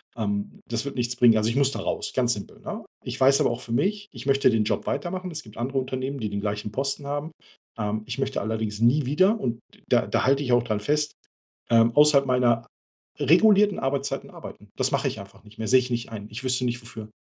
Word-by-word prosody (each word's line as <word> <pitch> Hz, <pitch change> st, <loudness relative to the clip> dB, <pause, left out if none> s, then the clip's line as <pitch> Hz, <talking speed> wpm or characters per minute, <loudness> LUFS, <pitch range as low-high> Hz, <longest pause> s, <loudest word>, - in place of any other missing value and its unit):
Ähm, 100 Hz, -3 st, -3 dB
das 115 Hz, +2 st, -2 dB
wird 140 Hz, -, -5 dB
nichts 120 Hz, -1 st, -1 dB
bringen. 120 Hz, -2 st, +6 dB
Also, 110 Hz, +1 st, +1 dB
ich 115 Hz, -, -2 dB
muss 140 Hz, -1 st, +3 dB
da -, -, -5 dB
raus, -, -, -3 dB
ganz 120 Hz, -2 st, +2 dB
simpel, 100 Hz, -, -9 dB
ne? -, -, -6 dB, 0.2 s
Ich -, -, -6 dB
weiß 135 Hz, +1 st, +5 dB
aber -, -, +3 dB
auch 120 Hz, -, -5 dB
für 115 Hz, -, -6 dB
mich, 205 Hz, -, 0 dB
ich 120 Hz, -1 st, -9 dB
möchte 135 Hz, -1 st, +4 dB
den 110 Hz, -3 st, +2 dB
Job 105 Hz, -, -2 dB
weitermachen. 185 Hz, +1 st, -3 dB
Es 155 Hz, -1 st, -6 dB
gibt 105 Hz, -2 st, -15 dB
andere 130 Hz, +4 st, -2 dB
Unternehmen, 130 Hz, +1 st, -4 dB
die 110 Hz, -3 st, -2 dB
den 100 Hz, 0 st, -3 dB
gleichen 105 Hz, 0 st, -3 dB
Posten 140 Hz, +3 st, -2 dB
haben. 145 Hz, +3 st, -3 dB, 0.5 s
Ähm, 105 Hz, 0 st, -2 dB
ich -, -, -5 dB
möchte -, -, -1 dB
allerdings 110 Hz, 0 st, -3 dB
nie 125 Hz, +5 st, +3 dB
wieder 185 Hz, -, +3 dB
und 120 Hz, -, -2 dB, 0.3 s
da -, -, +3 dB
da -, -, 0 dB
halte 135 Hz, +2 st, +3 dB
ich 125 Hz, -3 st, 0 dB
auch 120 Hz, -1 st, +4 dB
dran 110 Hz, -3 st, -1 dB
fest, 150 Hz, +7 st, 0 dB, 0.6 s
ähm, 115 Hz, 0 st, +5 dB
außerhalb 150 Hz, -2 st, +6 dB
meiner 120 Hz, -2 st, +2 dB, 0.5 s
regulierten 200 Hz, -, +5 dB
Arbeitszeiten 135 Hz, +1 st, -2 dB
arbeiten. -, -, -11 dB
Das -, -, +1 dB
mache -, -, +1 dB
ich -, -, -7 dB
einfach 100 Hz, 0 st, -13 dB
nicht 105 Hz, 0 st, -17 dB
mehr, 110 Hz, -, -3 dB
sehe 130 Hz, +4 st, +6 dB
ich 125 Hz, 0 st, -4 dB
nicht 120 Hz, -1 st, -2 dB
ein. 105 Hz, -2 st, -7 dB
Ich 110 Hz, +4 st, -6 dB
wüsste 130 Hz, 0 st, 0 dB
nicht, 120 Hz, 0 st, -2 dB
wofür. 110 Hz, -2 st, -10 dB
125 Hz, 235 wpm, -25 LUFS, 110-140 Hz, 0.6 s, bringen